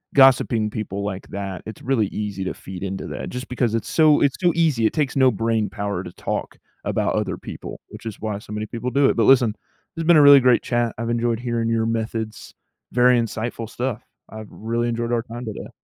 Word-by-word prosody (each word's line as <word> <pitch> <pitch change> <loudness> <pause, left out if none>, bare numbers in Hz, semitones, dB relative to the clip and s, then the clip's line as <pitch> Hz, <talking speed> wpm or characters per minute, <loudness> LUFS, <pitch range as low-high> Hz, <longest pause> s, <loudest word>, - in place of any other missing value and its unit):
gossiping 125 -5 +5
people 100 -2 -4
like 100 -2 -5
that, 95 -3 -5
it's 110 -2 -9
really 125 -5 +1
easy 100 -1 -4
to - - -2
feed 95 0 -9
into 95 0 -4
that. - - -5
Just 125 +1 -6
because 120 -3 0
it's 115 - -3
so 155 -2 +4
it's 140 -2 +2
too 175 -2 +3
easy. 155 -9 +2
It - - +2
takes 150 -5 0
no 130 -2 +5
brainpower 105 -3 -1
to 90 - -8
talk - - -4 0.3
about - - 0
other - - -1
people, - - -8
which - - -12
is 110 -3 -6
why 105 -2 -3
so 105 - -10
many 105 0 -3
people 115 +3 -4
do 140 +1 +4
it. - - +1
But 115 - +2
listen, 120 -5 +5 0.4
it's 165 0 -3
been 170 -1 +6
a - - +7
really 145 -1 +9
great 125 -2 +4
chat. 120 -2 0
I've 115 +1 -3
enjoyed 120 -1 0
hearing 120 -2 -1
your 115 -1 +1
methods. 110 -1 -3 0.4
Very 125 0 +5
insightful 115 0 -3
stuff. 120 -1 -3 0.3
I've 110 -1 -9
really 115 +2 -2
enjoyed 120 0 -2
our 120 - +2
time 120 +1 -8
today. 110 -2 -6
115 Hz, 215 wpm, -22 LUFS, 110-125 Hz, 0.4 s, really